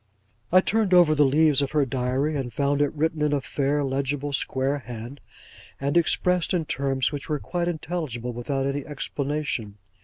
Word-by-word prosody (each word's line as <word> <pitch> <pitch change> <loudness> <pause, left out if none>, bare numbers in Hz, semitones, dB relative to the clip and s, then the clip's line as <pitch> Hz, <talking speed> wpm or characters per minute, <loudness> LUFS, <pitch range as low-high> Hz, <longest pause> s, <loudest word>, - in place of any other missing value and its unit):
I 185 +1 +7
turned 210 -2 +2
over 175 -4 +6
the 145 -2 +4
leaves 150 0 +4
of 140 0 -2
her 150 -2 +3
Diary, 130 +4 -1
and 130 -4 -3
found 140 +4 0
it 145 - +2
written 160 +1 0
in 150 -1 +2
a 145 - +2
fair 145 +2 -1
legible 140 +1 -2
square 135 +1 0
hand, 120 +2 -8 0.6
and 140 +2 -1
expressed 180 +1 +2
in 165 -3 0
terms 135 -2 0
which 145 0 -6
were 150 - +1
quite 175 +4 -3
intelligible 155 -8 -3
without 135 +3 -2
any 140 +1 -2
explanation. 140 -6 -3
145 Hz, 175 wpm, -25 LUFS, 135-155 Hz, 0.6 s, I